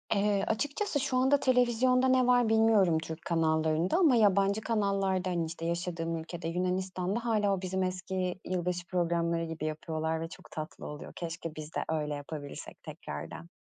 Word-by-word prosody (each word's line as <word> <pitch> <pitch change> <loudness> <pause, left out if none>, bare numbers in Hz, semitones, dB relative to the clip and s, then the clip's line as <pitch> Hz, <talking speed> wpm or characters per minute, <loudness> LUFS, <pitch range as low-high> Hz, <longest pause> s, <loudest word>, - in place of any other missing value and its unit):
Eee, 200 -1 +2
açıkçası 290 - -1
şu 260 -2 0
anda 265 +3 +4
televizyonda 255 0 +3
ne 255 -1 +4
var 245 -2 +4
bilmiyorum 220 -7 +4
Türk 160 0 -7
kanallarında, 160 - +2
ama 315 -9 +5
yabancı 200 -1 +3
kanallarda, 195 -4 0
hani, 170 -2 0
işte 165 +1 -6
yaşadığım 170 -1 -2
ülkede, 165 +1 -6
Yunanistan'da 185 +4 -1
hâlâ, 210 -4 +2
o 190 - -2
bizim 190 0 -1
eski 185 0 -2
yılbaşı 180 -1 -2
programları 170 -1 0
gibi 160 -1 -5
yapıyorlar 160 +1 -2
ve 165 - -3
çok - - -13
tatlı 155 -1 -6
oluyor, 150 0 -8
keşke 165 -1 -5
biz 155 0 -8
de - - 0
öyle 150 -2 -1
yapabilirsek 145 0 -7
tekrardan. 80 +3 -7
180 Hz, 160 wpm, -30 LUFS, 165-215 Hz, -, ama